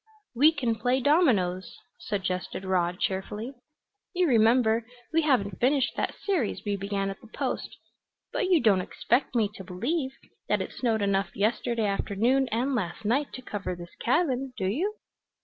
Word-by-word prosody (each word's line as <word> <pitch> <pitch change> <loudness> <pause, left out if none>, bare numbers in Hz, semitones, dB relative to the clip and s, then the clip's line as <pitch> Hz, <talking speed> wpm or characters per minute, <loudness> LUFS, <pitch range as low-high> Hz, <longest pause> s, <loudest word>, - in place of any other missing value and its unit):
"We 285 +6 +6
can 255 -7 0
play 245 +4 +1
dominoes," 240 - +2 0.2
suggested 190 -2 -3
Rod 180 -1 0
cheerfully. 210 +6 -3 0.6
"You 365 0 +3
remember 230 -2 +4 0.3
we 325 - +4
haven't 205 - +1
finished 260 0 +2
that - - -2
series 345 - 0
we 205 -1 0
began 195 0 -2
at 195 - -10
the - - -14
Post. - - -4 0.6
But 375 - 0
you 355 -3 +5
don't 200 -5 +4
expect 245 +7 0
me 225 -3 +3
to 190 - -9
believe 260 - -2 0.4
that - - +3
it - - -4
snowed 225 -4 0
enough 195 -2 0
yesterday 225 +2 0
afternoon 220 +6 +1
and 250 +5 0
last 210 -2 -3
night 270 +7 +1
to 255 - -8
cover 195 -5 -4
this 175 0 -10
cabin, 265 -2 +1
do 190 - -2
you?" 340 - 0
225 Hz, 160 wpm, -27 LUFS, 195-265 Hz, 0.6 s, We